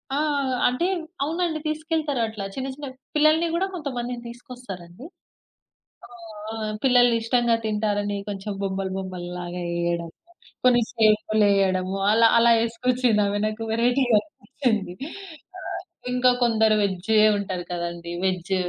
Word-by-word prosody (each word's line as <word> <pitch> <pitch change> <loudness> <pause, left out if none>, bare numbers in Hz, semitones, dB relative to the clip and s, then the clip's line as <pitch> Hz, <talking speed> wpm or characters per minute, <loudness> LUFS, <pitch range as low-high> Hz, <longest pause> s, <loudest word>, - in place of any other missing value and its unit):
ఆ! - - 0 0.5
అంటే 250 +8 0 0.4
అవునండి. 325 +1 -1
తీసుకెళ్తారు 310 -4 -1
అట్లా. 210 -3 -6
చిన్న 265 0 -3
చిన్న 285 0 -7 0.3
పిల్లలని 310 +2 +4
గూడా 380 +3 +1
కొంతమందిని 245 -6 -4
తీసుకొస్తారండి. 235 - -10 1.0
ఆ! - - -19 0.4
ఆ! - - -5 0.3
పిల్లలు 245 -2 +5
ఇష్టంగా 235 0 +2
తింటారని 205 -1 -1
కొంచెం 200 +1 -4
బొమ్మలు 190 -1 -2
బొమ్మలు‌ల్లాగా 180 -1 -5
యెయ్యాడము, 170 -1 -2 0.5
కొన్ని 245 -1 +5
షేపులెయ్యడము, 205 -4 +2 0.2
అలా 230 +1 +6
అలా 235 0 +6
యేసుకొచ్చిందామె 230 -3 +1
నాకు. 215 +1 -4
వేరైటీ‌గా 245 0 +3
అనిపిచ్చింది. 225 - -2 0.7
ఆహ్, - - -5 0.3
ఇంకా 250 0 +4
కొందరు 220 -2 +3
వెజ్జే 200 +3 +1 0.2
ఉంటారు 185 -3 -4
కదండీ. 170 0 -4
వెజ్. 185 0 0
220 Hz, 110 wpm, -24 LUFS, 190-250 Hz, 1.0 s, అలా